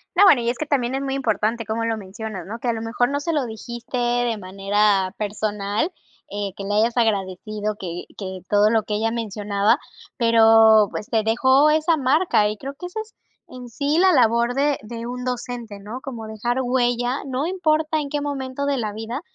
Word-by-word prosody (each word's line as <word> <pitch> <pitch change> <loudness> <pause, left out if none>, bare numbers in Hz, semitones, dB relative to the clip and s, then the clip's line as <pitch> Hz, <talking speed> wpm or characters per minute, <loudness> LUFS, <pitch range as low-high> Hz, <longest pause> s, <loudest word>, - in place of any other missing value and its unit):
No, 390 - +6
bueno, 295 -11 +7
y 235 - 0
es 245 - -2
que 310 - -3
también 265 -4 0
es 270 - -2
muy 270 -1 -2
importante, 230 -3 0
como 225 +1 -2
lo 225 - 0
mencionas, 205 -1 -7
¿no?, 230 +3 -6
que 245 - -4
a 235 - +2
lo 225 - -4
mejor 230 +2 0
no 285 0 -1
se 335 +4 -2
lo 295 -5 0
dijiste 235 +2 -6
de 240 -1 +1
manera 195 0 +1
personal, 210 - -2 0.4
eh, 200 -1 -3
que 200 - -6
le 205 +1 -2
hayas 230 +3 +2
agradecido 210 0 -1
que 175 -2 -5
que 190 -2 -6
todo 205 +1 +4
lo 225 -1 +2
que 210 - -3
ella 225 +2 0
mencionaba, 210 -2 0 0.4
pero, 225 -3 +6
pues, 210 - -5
te 220 -2 +1
dejó 260 +6 +4
esa 315 +2 +3
marca, 280 - +2
y 210 - -5
creo 275 +5 -6
que 355 +5 -7
esa 440 +5 -6
es 435 0 -13 0.4
en 250 -1 -9
sí 285 +6 -1
la 375 0 +5
labor 235 -3 +3
de 285 +1 +1
de 230 +2 -7
un 250 +1 -5
docente, 245 -4 -5
¿no?, 215 +6 -8
como, 240 -6 -7
dejar 220 +3 -2
huella, 245 0 0
no 265 +2 -2
importa 315 -3 +1
en 285 - -4
qué 295 - -1
momento 280 -1 -3
de 280 -1 0
la 215 -4 -3
vida, 225 +5 -5
235 Hz, 210 wpm, -22 LUFS, 215-270 Hz, 0.4 s, bueno